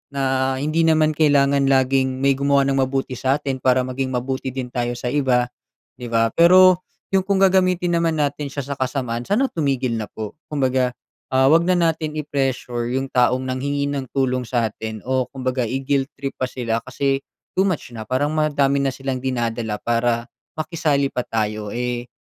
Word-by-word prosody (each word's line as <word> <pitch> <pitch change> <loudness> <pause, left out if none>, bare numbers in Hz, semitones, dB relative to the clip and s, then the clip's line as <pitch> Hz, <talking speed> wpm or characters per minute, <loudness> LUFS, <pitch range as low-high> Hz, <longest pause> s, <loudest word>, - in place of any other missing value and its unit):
na 135 -1 +1
hindi 155 +4 +1
naman 155 -1 +4
kailangan 140 -2 +3
laging 130 0 +2
may 135 -1 +3
gumawa 140 0 +3
ng 135 0 +1
mabuti 130 -1 -1
sa 130 +1 +2
atin 135 -3 -3
para 130 0 +3
maging 130 0 -3
mabuti 130 +2 -3
din 130 -1 -4
tayo 120 0 -2
sa 120 0 -3
iba, 125 -4 +1 0.4
'di 120 -2 -8
ba? 115 -1 +1
Pero 185 +1 +6 0.3
yung 190 - +4
kung 195 0 0
gagamitin 185 -2 +3
naman 165 -2 +1
natin 145 -1 -1
siya 140 -1 -5
sa 140 - -3
kasamaan 130 -3 -2
sana 215 - +1
tumigil 135 -6 -1
na 110 - -4
po. 110 -2 -7 0.2
Kumbaga, 130 -3 +1 0.4
ah, 130 0 +5
huwag 165 +2 +5
na 185 - +3
natin 160 -2 0
i-pressure 130 -5 -2
yung 135 - -3
taong 125 +1 +2
nanghingi 140 +2 -1
ng 140 -2 -3
tulong 130 -2 +1
sa 120 -1 +1
atin 110 +1 -6
o 130 -1 +1
kumbaga 130 -1 -2
i-guilt 135 +3 0
trip 135 0 -4
pa 130 - 0
sila 115 -3 -2
kasi 135 +1 0 0.3
too 190 - +3
much 180 -9 -2
na 110 - -6
parang 130 +5 0
madami 145 -3 +2
na 135 - +1
silang 135 -1 -3
dinadala 115 -4 -2
para 115 0 0 0.3
makisali 155 -3 0
pa 125 - -1
tayo, 105 -1 -2
eh, 120 0 -3
135 Hz, 180 wpm, -21 LUFS, 125-145 Hz, 0.4 s, Pero